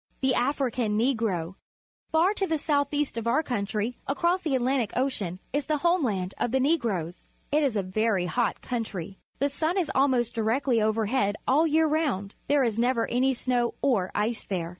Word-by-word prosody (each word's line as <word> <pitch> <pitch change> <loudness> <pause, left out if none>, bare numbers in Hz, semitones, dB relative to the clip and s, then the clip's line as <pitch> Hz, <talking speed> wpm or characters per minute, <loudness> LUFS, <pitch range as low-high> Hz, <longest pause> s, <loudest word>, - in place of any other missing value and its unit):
The 265 -1 +3
African 245 -5 0
Negro. 215 -8 0 0.2
— - - -51
Far 335 +5 +3
to 390 -2 -1
the 320 - 0
south 285 -2 0
east 290 -5 -1
of 230 - -5
our 310 +7 +2
country, 220 -2 -2
across 340 +7 +1
the 305 -6 0
Atlantic 255 -3 +1
Ocean, 220 -9 -1
is 285 -1 -1
the 305 - +1
home 340 +3 +2
land 190 -6 -1
of 240 - 0
the 265 - +2
Negroes. 230 - -1 0.2
It 300 +2 +3
is 275 -6 +1
a 200 - +1
very 195 0 0
hot 240 +5 -1
country. 200 -6 -4 0.2
The 280 - +1
sun 315 +6 -1
is 355 -5 0
almost 255 -4 +2
directly 230 +2 +1
overhead 215 0 +1
all 295 +5 +4
the - - +1
year 320 +1 +3
round. 285 -11 -1
There 285 -1 +3
is 230 -2 0
never 235 -1 +2
any 260 +2 +2
snow 245 -1 0
or 220 -10 +2
ice 220 +2 0
there. 175 -4 -3
245 Hz, 190 wpm, -27 LUFS, 215-285 Hz, 0.2 s, all